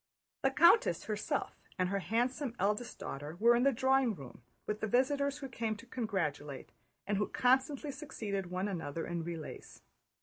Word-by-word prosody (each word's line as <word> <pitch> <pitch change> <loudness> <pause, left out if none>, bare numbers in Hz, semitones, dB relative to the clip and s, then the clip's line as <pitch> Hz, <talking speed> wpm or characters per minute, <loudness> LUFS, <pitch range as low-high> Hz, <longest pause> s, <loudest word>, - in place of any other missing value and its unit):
The 270 - +4
countess 340 - +5
herself - - -2 0.2
and 185 -1 +1
her 200 +1 0
handsome 245 +5 -1
eldest 210 +5 0
daughter 150 -4 -6
were 235 +2 +6
in 240 - +3
the 275 +2 +5
drawing 260 -2 +3
room 135 -5 -11 0.2
with 210 0 -2
the 220 - -1
visitors 280 +4 +2
who 275 - -6
came 225 -3 -2
to 205 - -12
congratulate, 160 - -3 0.3
and 200 0 0
who 205 - +1
constantly 265 +3 +2
succeeded 215 - -4
one 185 +2 -1
another 165 -4 -3
in 170 -1 -3
relays. 165 -2 -7
220 Hz, 165 wpm, -33 LUFS, 185-265 Hz, 0.3 s, were